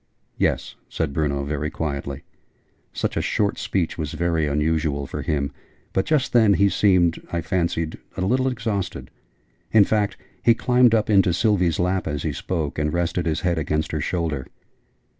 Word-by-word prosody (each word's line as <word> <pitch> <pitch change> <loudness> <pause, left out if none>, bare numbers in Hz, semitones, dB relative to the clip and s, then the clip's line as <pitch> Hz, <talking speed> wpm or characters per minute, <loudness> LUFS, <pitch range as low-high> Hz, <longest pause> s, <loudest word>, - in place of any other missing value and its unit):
"Yes," - - 0
said 80 -4 -2
Bruno, 70 -3 0
very 75 +1 -2
quietly. 70 -3 -4 0.7
Such - - -2
a - - +1
short 105 -1 0
speech 90 -3 -1
was 75 -3 -3
very 85 -2 0
unusual, 75 -1 0
for - - -5
him: 70 -3 -1 0.4
but 95 - 0
just 150 -5 +1
then 110 -4 +5
he 100 +3 +4
seemed, 90 -5 +3
I 85 - -1
fancied, 85 -2 -1 0.2
a - - -2
little 130 +8 +2
exhausted. 110 -7 -3 0.6
In 110 -2 +7
fact, 105 -1 0 0.2
he 115 - +5
climbed 125 -1 +4
up 110 0 +1
into 95 -3 +4
Sylvie's 90 -5 +2
lap 90 +1 0
as 75 -1 -3
he - - -1
spoke, 80 -5 -3
and 75 0 0
rested 85 +1 -1
his 80 -1 0
head 85 -3 +1
against 75 0 -1
her 75 - -2
shoulder. 80 -7 -2
85 Hz, 165 wpm, -23 LUFS, 75-100 Hz, 0.7 s, In